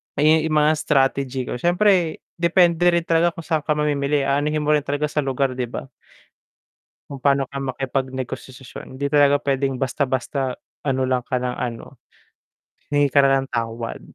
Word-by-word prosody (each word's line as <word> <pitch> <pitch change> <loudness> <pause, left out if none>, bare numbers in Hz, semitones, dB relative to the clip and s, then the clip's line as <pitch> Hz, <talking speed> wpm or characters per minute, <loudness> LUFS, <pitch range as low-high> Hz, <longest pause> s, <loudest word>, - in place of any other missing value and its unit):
Eh, 145 - 0 0.2
yung 155 - -1
mga 150 0 +4
strategy 135 -2 +1
ko, 125 - -5
siyempre 175 0 +2 0.2
depende 175 0 +3
rin 170 - +1
talaga 170 +1 +2
kung 165 - -8
saan 160 0 0
ka 150 0 -1
mamimili, 145 -1 0
aanuhin 150 +2 0
mo 150 - +1
rin 150 - +4
talaga 145 +1 -1
sa - - -1
lugar, 135 -1 0
'di 125 -1 -3
ba? 125 +2 -7 1.2
Kung 140 - -6
paano 140 -1 +2
ka 140 - -5
makipag 135 0 -2
negosasyon, 130 0 -8
hindi 140 +2 -2
talaga 145 -1 +4
puwedeng 135 -1 0
basta-basta 130 0 -1 0.3
ano 130 -1 +1
lang 130 -1 0
ka 125 - 0
lang 125 -1 -2
ano, 115 -2 -6 0.9
hingi 145 -1 +2
ka 140 - +4
na 135 -1 +3
ng - - -10
tawad. 115 0 -3
140 Hz, 170 wpm, -22 LUFS, 130-150 Hz, 1.2 s, mga